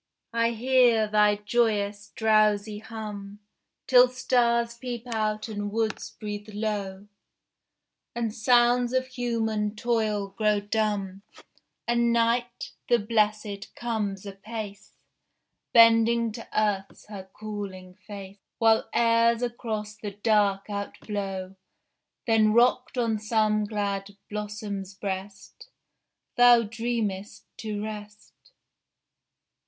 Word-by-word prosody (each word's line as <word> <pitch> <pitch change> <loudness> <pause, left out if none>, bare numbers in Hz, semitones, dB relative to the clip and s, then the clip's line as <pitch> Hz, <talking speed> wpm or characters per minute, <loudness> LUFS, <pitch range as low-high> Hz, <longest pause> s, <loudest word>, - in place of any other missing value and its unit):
I 230 0 +2
hear 240 -2 +3
thy 210 0 +4
joyous, 210 -1 0
drowsy 215 -1 +2
hum, 210 -2 -8 0.5
Till 250 -1 +7
stars 235 -2 +1
peep 240 -1 -6
out 215 -2 -2
and 205 -2 -4
woods 220 0 -2
breathe 210 0 -6
low, 205 -2 -3 1.1
And 230 -2 -2
sounds 240 +1 +3
of 260 0 +1
human 225 -4 -2
toil 215 -3 0
grow 210 +1 +1
dumb, 205 -2 -2 0.7
And 235 0 +2
Night, 235 +1 0 0.2
the 240 - +5
blessèd, 210 -2 0
comes 210 -5 -3
apace, 205 +1 -8 0.8
Bending 230 0 +5
to 225 +2 -9
Earth's 200 -2 -2
her 195 -3 -9
cooling 200 -4 -7
face, 200 0 -11 0.2
While 225 -1 +3
airs 230 0 +3
across 220 -3 -4
the 210 -1 -6
dark 205 -1 +1
outblow: 200 -2 -5 0.7
Then 220 -2 +4
rocked 250 +2 +3
on 230 -3 +1
some 215 -1 +1
glad 200 -1 -3
blossom's 205 -2 -5
breast, 195 - -7 0.7
Thou 245 -1 +7
dreamest 220 -3 -3
to 210 -2 -4
rest. 210 -1 -8
215 Hz, 100 wpm, -26 LUFS, 205-230 Hz, 1.1 s, Till